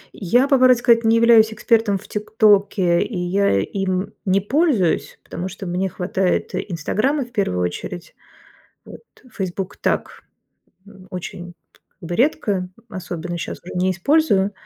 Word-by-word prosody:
Я, 245 +8 +2
по 280 -1 +4
правде 255 0 +6
сказать, 235 -1 +3
не 225 0 +4
являюсь 230 -1 +5
экспертом 220 -2 +1
в - - -14
"ТикТоке", 205 -4 +2
и 220 - -3
я 180 - +1
им 185 - -2
не 195 0 +2
пользуюсь, 250 - 0
потому 175 +2 -6
что 190 +1 -8
мне 180 +2 -2
хватает 185 +1 -1
"Инстаграма" 215 - -1
в 240 - -19
первую 140 - -1
очередь. 170 - -5 0.7
Вот - - -12 0.3
"Фейсбук"- 190 -1 -5
так, - - -2 0.7
м, 195 -2 -16
очень 180 -1 -7 0.4
как 170 -4 -10
бы 175 - -3
редко, 205 - 0 0.2
особенно 175 -3 -6
щас - - -5
уже 180 - -9
не 185 +1 +1
использую, 200 - +2
195 Hz, 145 wpm, -20 LUFS, 180-225 Hz, 0.7 s, правде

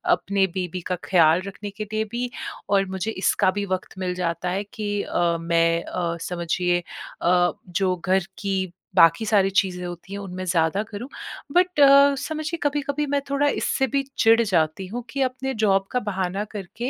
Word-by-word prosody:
अपने 195 0 0
बेबी 180 -1 -3
का - - +2
ख़्याल 170 -2 +4
रखने 205 +1 -7
के 215 - -3
लिए 215 - +1
भी 245 +1 -2 0.4
और 195 -1 +3
मुझे 190 +3 -3
इसका 190 -1 +2
भी 200 +1 -3
वक़्त 185 - -10
मिल 180 -1 -1
जाता 175 0 -2
है 195 +3 -1
कि 215 -4 -3
अ, 170 -1 0
मैं 165 0 +2
अ, 170 -2 -3
समझिए 175 +1 -1 0.4
अ, 175 0 +3 0.2
जो 185 +1 +1
घर 190 -1 +2
की 190 -3 -2 0.2
बाकी 165 +3 +5
सारी 205 -3 +3
चीज़ें 180 -3 +1
होती 175 +2 -8
हैं 200 - -4
उनमें 185 -2 -6
ज़्यादा 170 +2 +1
करूँ। 220 +3 -7 0.5
बट 360 -2 +2
अ, 280 0 +7
समझिए 315 +2 -4
कभी-कभी 290 0 -1
मैं 285 - +2
थोड़ा 280 +1 +2
इससे 270 -1 0
भी 275 +3 0
चिढ़ 225 +1 +5
जाती 185 -3 0
हूँ 240 +5 -5
कि 275 - -2
अपने 255 +1 -4
जॉब 195 -1 +3
का 250 - +1
बहाना 195 -2 -2
करके 215 +4 -5
195 Hz, 180 wpm, -24 LUFS, 180-235 Hz, 0.5 s, अ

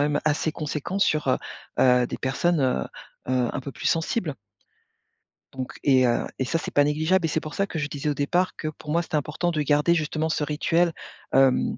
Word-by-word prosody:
même 145 0 +1
assez 155 +1 +1
conséquents 155 +5 -3
sur 155 -7 +2
heu 130 - +3 0.4
heu, 125 -1 +5
des - - -6
personnes, 150 +5 +1
heu 125 - +1 0.4
heu, 125 -2 +2
un 135 - -2
peu 140 +1 -7
plus - - -5
sensibles. 165 -1 0 1.2
Donc 130 -1 -5
et 130 -3 +5
heu, 120 - +1
et 130 - +1
ça 165 - 0
c'est - - -6
pas 145 - +5
négligeable 160 +5 +2
et - - 0
c'est 160 - 0
pour 155 -1 -8
ça 200 - 0
que 175 - -5
je 150 - -1
disais 145 0 -3
au - - +1
départ 175 +7 0
que 155 - -4
pour 150 0 -8
moi 170 +2 +2
c'était 160 - -4
important 150 +4 -1
de 155 -2 -1
garder 150 +3 +3
justement 155 0 -1
ce 155 - 0
rituel, 165 +3 +1 0.4
hem, 135 -1 +3
150 Hz, 215 wpm, -25 LUFS, 135-165 Hz, 1.2 s, heu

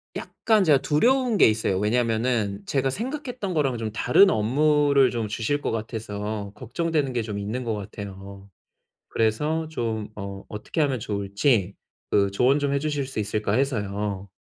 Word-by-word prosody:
약간 220 -3 +1
제가 150 -5 +5
두려운 240 - +2
게 - - +7
있어요. 110 -3 +1
왜냐하면은 110 -2 0
제가 135 -1 0
생각했던 245 - -4
거랑 135 -6 +1
좀 110 -1 -3
다른 195 - +5
업무를 140 +4 +3
좀 115 -3 -2
주실 115 +7 -1
것 - - -1
같아서 105 -2 -4
걱정되는 140 +3 -1
게 120 - 0
좀 105 -2 -5
있는 110 +5 -3
것 115 - -2
같아요. 100 -1 -9 0.6
그래서 150 +9 0
좀 110 -7 -3
어 100 -1 -7
어떻게 105 +9 -4
하면 135 -5 +1
좋을지 100 0 0 0.4
그 100 -1 +3
조언 125 +7 +3
좀 140 -1 0
해 - - +2
주실 145 -2 -2
수 135 - -7
있을까 105 0 -1
해서요. 100 -6 -1
115 Hz, 315 characters per minute, -25 LUFS, 105-145 Hz, 0.6 s, 게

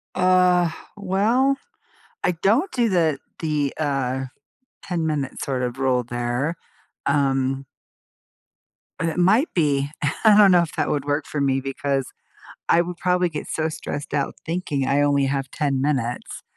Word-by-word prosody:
Uh, 180 -1 +4 0.3
well, 220 +8 +2 0.7
I - - +3
don't 225 - +1
do 235 -3 +1
the 165 -6 +2 0.2
the, 150 -4 0
uh, 135 -3 -1 0.6
ten-minute, 155 -6 -2
sort 130 -2 -2
of, 125 +1 -3
rule 125 -2 +2
there, 120 +6 -2 0.5
um 135 -1 +1 1.3
but 165 - 0
it 160 - -5
might 215 - +3
be 145 -4 +1 0.3
I 215 -2 +7
don't 200 -3 +7
know 175 -1 +6
if 165 - -4
that - - 0
would 145 -1 -1
work 145 +1 -1
for 145 - -3
me 135 -1 +1
because 135 0 -2 0.6
I 170 - +5
would 175 0 -3
probably 180 0 +1
get 150 -2 -6
so 160 0 -1
stressed 145 -1 -6
out 140 -1 -1
thinking 160 -6 -2
I 140 +1 +2
only 140 -1 +2
have 135 -1 -2
10 140 -4 -1
minutes, 130 -5 -2
150 Hz, 150 wpm, -23 LUFS, 135-180 Hz, 1.3 s, I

